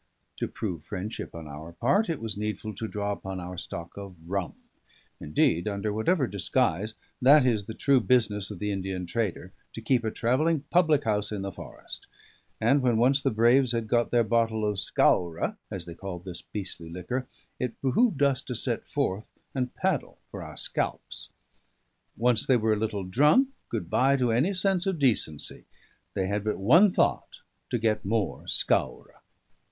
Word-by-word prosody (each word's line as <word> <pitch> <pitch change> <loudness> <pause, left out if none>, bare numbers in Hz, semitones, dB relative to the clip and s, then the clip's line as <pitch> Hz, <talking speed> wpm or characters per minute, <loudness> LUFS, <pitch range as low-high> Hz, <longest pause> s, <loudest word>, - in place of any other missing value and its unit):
To - - -2
prove 90 -8 -5
friendship 100 -1 -6
on 80 -2 -8
our 75 +3 -9
part, 140 - +2
it 165 - -1
was 110 -1 -4
needful 105 +1 -4
to 110 +3 -5
draw 105 -1 -2
upon 95 -2 -5
our 90 +1 -6
stock 85 -1 -5
of 100 -2 -8
rum 95 -1 -2 0.6
indeed, 80 +4 +1
under 105 0 -2
whatever 135 - +2
disguise, 100 0 0 0.3
that 140 +2 +7
is 110 -5 +1
the 110 - -6
true 140 -2 +3
business 110 -5 +2
of 105 - -7
the 105 +2 -2
Indian 95 -2 -3
trader, 95 -1 -3 0.2
to - - -6
keep 120 +2 +1
a 110 - 0
travelling 135 +8 +1
public 160 -4 +4
house 105 -2 0
in 100 -2 -3
the 100 - -4
forest; - - -9 0.5
and 140 +1 +3
when 120 -3 +2
once 135 +4 +3
the 135 - +2
braves 120 +2 +4
had 115 -1 -1
got 120 +1 +2
their 120 -1 +3
bottle 110 0 +1
of 105 -1 -1
scaura 85 -2 +1
(as 90 -3 -5
they 85 - -8
call 90 +1 -6
this 90 0 -4
beastly 95 -5 -5
liquor), 105 +10 -4 0.3
it 125 -2 -3
behoved 145 - +2
us 140 -2 +3
to 125 - -6
set - - -2
forth 95 +4 -1 0.3
and 125 -2 -2
paddle 185 -8 -1
for - - -7
our - - -9
scalps. - - -2 0.9
Once 120 0 +3
they 130 - +5
were 110 -1 +2
a 105 - -1
little 105 -2 -2
drunk, 150 - +4 0.2
good 105 -8 -3
bye 135 +9 +3
to 125 -3 +1
any 130 - +2
sense 190 0 +2
or 195 - +2
decency; 120 - 0 0.5
they 95 - 0
had 100 +2 -1
but 105 0 0
the - - -8
one 165 - +6
thought, - - 0 0.3
to 120 - 0
get 110 -1 0
more 105 0 -1
scaura. - - -1
110 Hz, 180 wpm, -27 LUFS, 95-130 Hz, 0.9 s, that